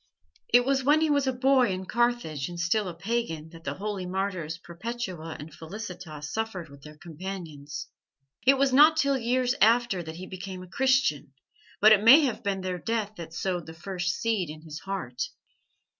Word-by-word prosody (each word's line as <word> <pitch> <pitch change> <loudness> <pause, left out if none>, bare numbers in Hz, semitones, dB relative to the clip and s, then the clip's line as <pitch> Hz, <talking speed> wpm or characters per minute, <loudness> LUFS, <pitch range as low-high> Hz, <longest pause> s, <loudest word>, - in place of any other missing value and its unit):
It 245 +1 +6
was 270 0 +1
when 295 +4 +5
he 315 -1 +2
was 285 -2 +2
a - - +3
boy 255 -1 +3
in 185 0 -4
Carthage 235 - 0
and 175 -1 -7
still 190 +4 +1
a 175 - -4
pagan 170 -5 -3
that 165 -1 -13
the 140 0 -3
holy 200 -2 -4
martyrs 185 -4 -2
Perpetua 180 -2 -6
and 150 +1 -9
Felicitas 160 -4 -7
suffered 220 -7 -3
with 140 0 -14
their 150 +1 -12
companions. 165 -3 -7 0.6
It 275 0 +7
was 270 -1 +2
not 305 +4 +7
till 280 -3 +3
years 250 0 +1
after 230 -3 +4
that 160 -1 -7
he 180 +2 -7
became 185 0 -7
a - - -12
Christian, 260 - +1 0.5
but 215 +1 +8
it 210 -2 +7
may 265 +8 +9
have 260 -6 -1
been 195 -1 -1
their 185 -1 -3
death 220 +1 -2
that 165 -2 -8
sowed 175 0 -3
the 160 - -9
first 180 0 -2
seed 215 -8 -1
in 155 +1 -9
his 155 -1 -8
heart." 190 -11 -5
190 Hz, 190 wpm, -27 LUFS, 165-240 Hz, 0.6 s, may